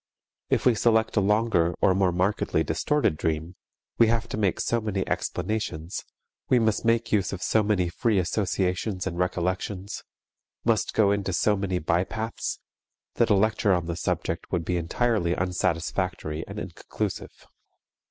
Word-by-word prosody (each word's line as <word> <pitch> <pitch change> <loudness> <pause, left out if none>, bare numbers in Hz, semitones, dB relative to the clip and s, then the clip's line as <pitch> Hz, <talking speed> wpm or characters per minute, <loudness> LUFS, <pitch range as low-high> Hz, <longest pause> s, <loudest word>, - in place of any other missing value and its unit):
If - - +1
we 125 - +6
select 110 +1 +2
a - - +4
longer 100 -5 +2
or 95 - +4
more 95 -1 +2
markedly 90 -2 +1
distorted 80 - +1
dream, 80 +3 -2 0.4
we 115 - +7
have 115 0 +1
to - - -3
make 100 -4 0
so 115 0 0
many 100 -3 -2
explanations, 95 -6 -3 0.4
we 130 - +5
must 110 -3 +1
make 115 0 +1
use 100 -3 +2
of 95 - -5
so 110 - +3
many 100 -4 +1
free 105 +5 0
associations 95 0 -1
and 85 -2 -3
recollections, 90 +2 -2 0.6
must - - +1
go 100 -2 +4
into 100 -2 -1
so 105 +4 +3
many 95 -2 -1
bypaths, 95 +8 -2 0.6
that - - +3
a - - +5
lecture 105 0 +2
on 90 -2 0
the 85 0 -3
subject - - -3
would 85 -2 -1
be 90 - 0
entirely 90 +1 0
unsatisfactory 90 -3 -1
and - - -8
inconclusive. - - -5
95 Hz, 150 wpm, -26 LUFS, 85-110 Hz, 0.6 s, we